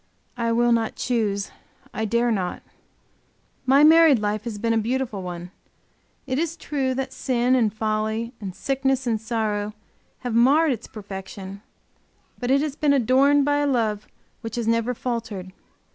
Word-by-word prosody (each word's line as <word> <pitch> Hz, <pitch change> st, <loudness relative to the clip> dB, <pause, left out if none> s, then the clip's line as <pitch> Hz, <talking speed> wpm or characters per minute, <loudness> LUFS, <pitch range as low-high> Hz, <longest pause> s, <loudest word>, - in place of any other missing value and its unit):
I 235 Hz, -1 st, -1 dB
will 240 Hz, +1 st, +3 dB
not 230 Hz, -1 st, +1 dB
choose, 210 Hz, -5 st, -1 dB, 0.4 s
I 220 Hz, -, -2 dB
dare 235 Hz, +2 st, +1 dB
not. 185 Hz, -5 st, -2 dB, 1.0 s
My 275 Hz, +3 st, +6 dB
married 320 Hz, -2 st, +7 dB
life 210 Hz, 0 st, -2 dB
has 225 Hz, -3 st, -4 dB
been 230 Hz, +2 st, 0 dB
a -, -, +2 dB
beautiful 230 Hz, -2 st, -2 dB
one. 175 Hz, -1 st, -7 dB, 0.7 s
It 260 Hz, 0 st, -1 dB
is 335 Hz, 0 st, -2 dB
true 270 Hz, -5 st, -2 dB
that 265 Hz, 0 st, -3 dB
sin 250 Hz, -1 st, +1 dB
and 230 Hz, -5 st, +3 dB
folly, 220 Hz, +2 st, -2 dB
and 190 Hz, -3 st, -6 dB
sickness 270 Hz, -1 st, 0 dB
and 225 Hz, -3 st, 0 dB
sorrow, 215 Hz, -2 st, -2 dB, 0.5 s
have 245 Hz, -2 st, -3 dB
marred 280 Hz, +7 st, +4 dB
its 235 Hz, -2 st, -4 dB
perfection, 195 Hz, -1 st, -8 dB, 0.8 s
but 245 Hz, -, -3 dB
it 275 Hz, +1 st, +4 dB
has 295 Hz, -2 st, -2 dB
been 295 Hz, -2 st, +2 dB
adorned 275 Hz, +3 st, +4 dB
by 290 Hz, 0 st, +2 dB
a 290 Hz, 0 st, +1 dB
love 220 Hz, -6 st, 0 dB, 0.3 s
which 225 Hz, -2 st, -6 dB
has 235 Hz, -2 st, -2 dB
never 230 Hz, +2 st, +1 dB
faltered. 225 Hz, -7 st, -4 dB
235 Hz, 160 wpm, -24 LUFS, 215-265 Hz, 1.0 s, married